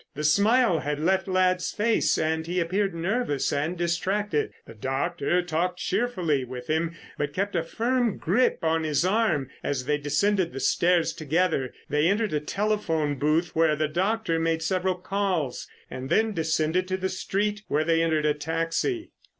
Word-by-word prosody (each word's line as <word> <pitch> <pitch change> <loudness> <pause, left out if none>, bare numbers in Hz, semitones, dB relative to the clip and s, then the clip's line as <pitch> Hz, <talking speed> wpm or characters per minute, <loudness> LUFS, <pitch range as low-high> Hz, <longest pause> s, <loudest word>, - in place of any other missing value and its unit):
The 150 - -4
smile 200 +4 +4
had 150 0 -3
left 190 +5 +1
Ladd's 185 -1 +1
face 225 +2 +2
and 160 0 -1
he 180 +1 -1
appeared 190 +2 0
nervous 175 - -1
and 155 +5 -1
distracted. 175 - 0
The - - -11
doctor 135 +8 -1
talked 175 +1 -1
cheerfully 180 - 0
with 125 0 -7
him 160 +3 -1 0.2
but 145 0 -2
kept 200 +1 -1
a 170 - +2
firm 235 +6 0
grip 205 +7 +1
on 160 0 +2
his 155 +2 +1
arm 185 - +1
as 130 -3 -2
they 150 +1 +1
descended 170 +6 +1
the 135 - -5
stairs 175 +3 +2
together. 155 -3 0 0.2
They 150 +2 +2
entered 205 0 +1
a 150 - +2
telephone 160 -5 -1
booth 155 +4 +1
where 160 -1 +3
the 155 +1 0
doctor 185 +2 0
made 165 0 0
several 185 +2 0
calls, 185 -7 -2 0.2
and 130 +1 -7
then 220 0 +2
descended 160 +2 0
to 185 0 -1
the 190 0 -1
street, 205 +3 -2
where 150 +2 +1
they 165 0 +2
entered 160 -2 +1
a 150 - +3
taxi. 165 - -2
170 Hz, 165 wpm, -26 LUFS, 155-195 Hz, 0.2 s, smile